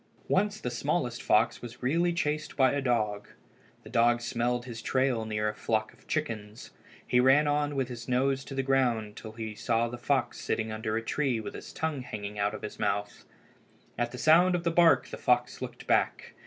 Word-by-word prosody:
Once 205 +2 +1
the 125 - -3
smallest 125 +1 -1
fox 110 +2 +2
was 120 +1 -10
really 170 +7 +2
chased 155 -2 -2
by 130 -2 +5
a 140 - -1
dog. 110 -5 0 0.6
The - - -11
dog 120 0 +4
smelled 120 +1 -1
his 120 -2 -7
trail 130 -4 +1
near 105 -1 -1
a 105 - -1
flock 110 0 -1
of - - -24
chickens. 110 -8 -4 0.3
He 125 - +3
ran 135 +4 +5
on 145 0 0
with 135 -2 0
his 120 -1 -8
nose 135 +2 +1
to 135 - -7
the 135 - 0
ground 120 -6 +1
till 110 -1 -9
he 110 -1 -5
saw 115 +2 0
the 120 0 -7
fox 135 +2 0
sitting 110 0 -2
under 110 0 -2
a 115 - -3
tree 130 -1 0
with 110 - -6
his - - -9
tongue 160 -4 -2
hanging 105 -4 -6
out 100 +1 0
of - - -9
his 105 - -7
mouth. 100 0 -2 0.7
At 120 +1 -1
the 125 - -7
sound 170 +7 +5
of 170 - -2
the 170 - +1
bark 165 -7 +5
the - - -7
fox 125 0 +1
looked - - -7
back. - - +1
125 Hz, 205 wpm, -29 LUFS, 110-140 Hz, 0.7 s, by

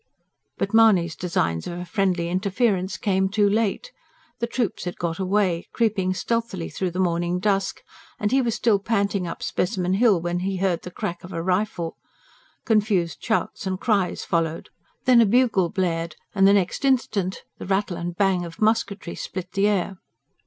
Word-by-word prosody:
But - - -2
Mahony's 195 -8 +5
designs 170 - -1
of 175 - -5
a 180 - -5
friendly 180 -2 0
interference 190 +1 0
came 190 -3 +1
too 205 +1 +3
late. 215 - 0 0.5
The 235 - -1
troops 235 -6 -2
had 180 - -4
got 170 0 -3
away, 185 -3 +1
creeping 195 -5 +1
stealthily 230 -5 -2
through 185 - -2
the 175 - -7
morning 175 -1 +1
dusk; 195 0 0 0.4
and 210 - 0
he 265 +1 +4
was 235 -3 0
still 220 -4 +2
panting 200 -3 0
up - - -6
Specimen 180 -1 -1
Hill 205 -2 +4
when 175 +1 -2
he 190 +1 -2
heard 180 -2 0
the - - -8
crack 175 0 -5
of 180 - -9
a 165 - -3
rifle. 180 -2 -1 0.7
Confused 205 -7 +1
shouts 220 -3 -1
and 185 0 -2
cries 200 -6 0
followed. 165 -1 -1 0.4
Then 250 -2 +6
a - - +6
bugle 225 -6 +3
blared, 170 -4 -1 0.2
and 195 -1 +5
the 200 - +6
next 195 +5 +1
instant 220 -8 0 0.2
the - - -7
rattle 190 -1 0
and 170 0 -4
bang 190 -3 +2
of 170 -1 -9
musketry 215 -4 0
split 185 -1 -6
the 200 +1 +2
air. 195 -2 -1
190 Hz, 175 wpm, -24 LUFS, 175-210 Hz, 0.7 s, Then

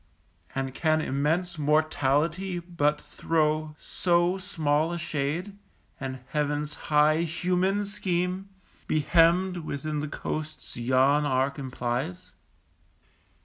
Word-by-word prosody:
And 135 -1 -2
can 155 +2 +2
immense 160 +5 0
Mortality 155 +4 +1
but 170 -4 0
throw 155 -1 0
So 175 +1 +1
small 160 -4 0
a 175 - -2
shade, 170 +5 -3 0.4
and 130 -1 -5
Heaven's 150 0 -1 0.2
high 150 +1 +5
human 180 +4 0
scheme 185 -1 -2 0.4
Be 155 - +2
hemmed 175 +4 +4
within 155 -2 -3
the 150 - -2
coasts 155 +1 -5
yon 130 +4 +3
arc 135 0 0
implies? 130 +6 -3
155 Hz, 105 wpm, -27 LUFS, 145-175 Hz, 0.4 s, high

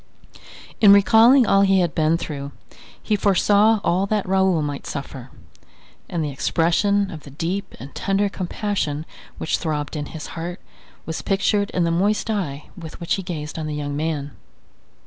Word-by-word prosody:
In 205 -2 +7
recalling 225 +6 +6
all 195 -1 +4
he 195 -1 +4
had 175 -3 0
been 160 +1 +2
through, 140 -4 -6 0.5
he 215 - +1
foresaw 205 +2 +3
all 185 +2 +1
that 210 -2 -1
Raoul 190 -4 +2
might 145 -1 -5
suffer; 135 -2 -7 0.8
and 170 -2 -2
the 145 - -3
expression 190 +8 +1
of 160 - -7
the 145 - -13
deep 180 +7 -4
and 135 +2 -10
tender 195 +1 0
compassion 185 -5 -3 0.3
which - - -1
throbbed 150 -2 -3
in 145 -1 -4
his 160 - -8
heart 175 +2 -5 0.5
was 160 - -4
pictured 200 +1 +1
in 180 - 0
the 170 - +1
moist 205 +6 +1
eye 150 -9 -4
with 165 -4 -10
which 170 - -1
he 195 - -1
gazed 160 -4 -6
on 155 - -4
the 150 - -4
young 145 -1 -4
man. 150 -2 -2
175 Hz, 165 wpm, -22 LUFS, 150-200 Hz, 0.8 s, In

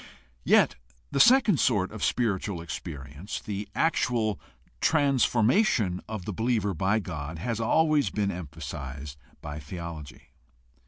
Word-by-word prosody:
Yet - - +4 0.3
the 140 - 0
second 230 - +6
sort 105 -7 +2
of 110 -2 -6
spiritual 100 -5 0
experience, 75 +2 -6
the 100 0 -5
actual 120 -10 +1 0.4
transfonnation 130 - +3
of 110 -5 -5
the 105 - -3
believer 110 -1 0
by 95 +6 +1
God, 80 -6 -5
has 115 +7 -3
always 150 +5 +3
been 100 -2 -1
empha 80 -2 -8
sized 70 +1 -7 0.2
by 75 0 -5
theology. 75 -3 -8
100 Hz, 120 wpm, -27 LUFS, 80-120 Hz, 0.4 s, second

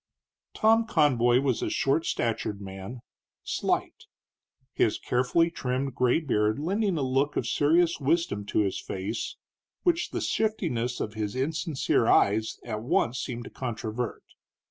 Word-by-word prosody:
Tom 225 +1 +4
Conboy 130 - +3
was 130 -4 0
a - - -1
short 140 +4 +1
statured 110 -3 -1
man, 95 +5 -8 0.4
slight; - - -2 0.7
his - - +2
carefully 130 +7 +1
trimmed 130 -2 -2
gray 125 +4 +2
beard 110 -8 +1
lending 190 +4 0
a 145 - 0
look 135 +3 0
of - - 0
serious 165 +3 +2
wisdom 140 -7 0
to 105 - +2
his 100 -2 -1
face 100 +4 -4 0.5
which 350 -2 +1
the - - -3
shiftiness 145 - -1
of 105 - -3
his 110 0 -3
insincere 145 -3 0
eyes 110 +2 +3
at 110 -3 -4
once 120 +1 +1
seemed 120 -1 -4
to - - -10
controvert. 115 -1 -4
130 Hz, 140 wpm, -27 LUFS, 110-160 Hz, 0.7 s, Tom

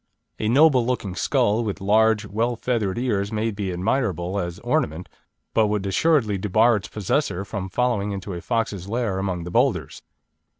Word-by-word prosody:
A 110 - -1
noble 135 0 +5
looking 115 -6 -2
skull, 115 +3 +1
with 105 -2 -3
large, 110 +2 +3
well 115 +4 -1
feathered 110 -5 -1
ears 105 -5 -1
may 110 +1 -1
be 100 -2 -3
admirable 95 - -1
as 85 -2 -4
ornament, 80 +4 -1 0.5
but 110 -2 +3
would 105 -1 -1
assuredly 110 - +2
debar 110 +4 +3
its 105 +1 -7
possessor 100 -2 -1
from 95 -2 -5
following 105 -1 0
into 100 0 -5
a 85 - -6
fox's 105 -5 -2
lair 115 -4 -1
among 90 -3 -2
the 90 - -7
boulders. - - 0
105 Hz, 165 wpm, -23 LUFS, 95-115 Hz, 0.5 s, noble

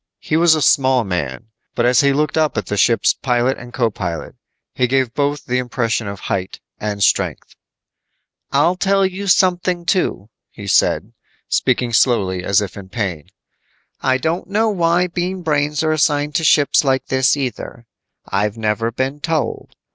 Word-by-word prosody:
He - - -3
was 165 0 +5
a 155 - 0
small 130 -2 +3
man, 90 -4 -4 0.3
but 120 - +1
as 125 0 +4
he 140 -1 +3
looked 150 +2 0
up 155 -6 +1
at 105 - -1
the 105 - -3
ship's 115 +3 +3
pilot 125 +1 0
and 125 0 -11
co 120 -3 0
pilot, 90 -5 -5 0.4
he 125 - +1
gave 130 -2 0
both 145 0 -1
the 125 0 0
impression 120 -3 -2
of 100 -1 -7
height 95 -1 -3 0.2
and 105 -1 -2
strength. - - 0 1.0
"I'll 155 +6 +3
tell 195 +1 +2
you 190 +2 -4
something, 180 -1 +2
too," 175 - -1 0.2
he 100 - -11
said, 95 - +1 0.4
speaking 120 -1 0
slowly 100 -7 +2
as 100 +2 +2
if 100 - -6
in 95 -2 -10
pain. 95 -8 -4 0.7
"I 130 0 +2
don't 160 +6 -2
know 220 +2 +1
why 175 -2 +2
Bean 180 +1 -3
Brains 150 -1 0
are 155 - +1
assigned 150 -1 +1
to 160 - 0
ships 150 -2 +4
like 135 -1 0
this 130 +2 +2
either. 125 -3 -5 0.4
I've 105 +2 -1
never 110 +1 -1
been 130 +4 -3
told. 155 0 -3
130 Hz, 170 wpm, -18 LUFS, 110-160 Hz, 1.0 s, was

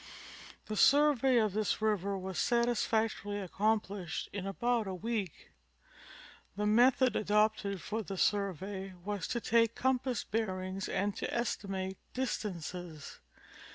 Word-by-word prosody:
The 215 - -4
survey 270 0 +5
of 215 -4 +2
this 215 0 0
river 200 -2 0
was 190 -1 -4
satisfactorily 225 -3 +1
accomplished 200 -1 -1
in 195 -1 -4
about 235 +2 0
a 190 - -3
week. 205 -3 -4 1.0
The 210 +1 -1
method 245 +4 +4
adopted 210 -2 +1
for 220 +1 -2
the 195 -2 -6
survey 195 0 -1
was 205 -3 -2
to 240 - -1
take 230 0 +2
compass 255 -2 0
bearings 190 -3 -3
and 200 +1 0
to - - -3
estimate 195 -5 -2 0.2
distances. 180 - -4
210 Hz, 120 wpm, -32 LUFS, 190-230 Hz, 1.0 s, survey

